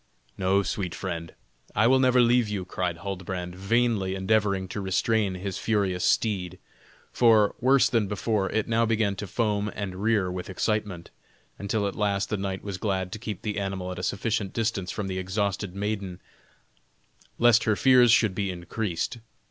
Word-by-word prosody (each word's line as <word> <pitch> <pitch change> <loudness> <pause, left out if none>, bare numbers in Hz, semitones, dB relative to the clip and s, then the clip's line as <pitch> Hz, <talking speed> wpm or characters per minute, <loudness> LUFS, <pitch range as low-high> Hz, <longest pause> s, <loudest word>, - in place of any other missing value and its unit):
"No, 95 +1 +2
sweet 95 -3 -3
friend, 85 -1 -5 0.4
I 110 - +4
will 130 +2 +5
never 130 -1 +4
leave 120 -2 +3
you!" 100 -3 -3
cried 90 -2 -2
Huldbrand, 90 -1 -5
vainly 100 -1 +1
endeavoring 100 -1 +1
to 100 - -4
restrain 95 +1 +1
his 95 0 -4
furious 100 -5 0
steed; 95 -3 0 0.5
for, 110 -4 +4
worse 130 +2 +5
than 115 -4 +1
before, 105 0 -1
it 110 -1 -1
now 115 0 +2
began 110 -3 +1
to 105 - -5
foam 105 -1 -1
and 95 -3 -4
rear 105 -4 +1
with 90 +1 -6
excitement, 100 -2 -2 0.5
until 100 +1 -1
at 100 - -3
last 100 -1 0
the 105 - -1
knight 95 -1 -4
was 100 -2 -5
glad 95 -3 -1
to 110 - -6
keep 105 -4 -6
the 105 -1 -2
animal 95 -2 -3
at 90 - -6
a - - -4
sufficient 100 +1 -2
distance 110 -5 -1
from 105 -3 -3
the 95 -1 -3
exhausted 95 0 -2
maiden 100 -3 -3 1.2
lest 120 -1 +5
her 110 -2 +3
fears 125 0 +5
should 110 -4 +4
be 100 0 -2
increased. 90 +3 -3
100 Hz, 170 wpm, -26 LUFS, 95-110 Hz, 1.2 s, will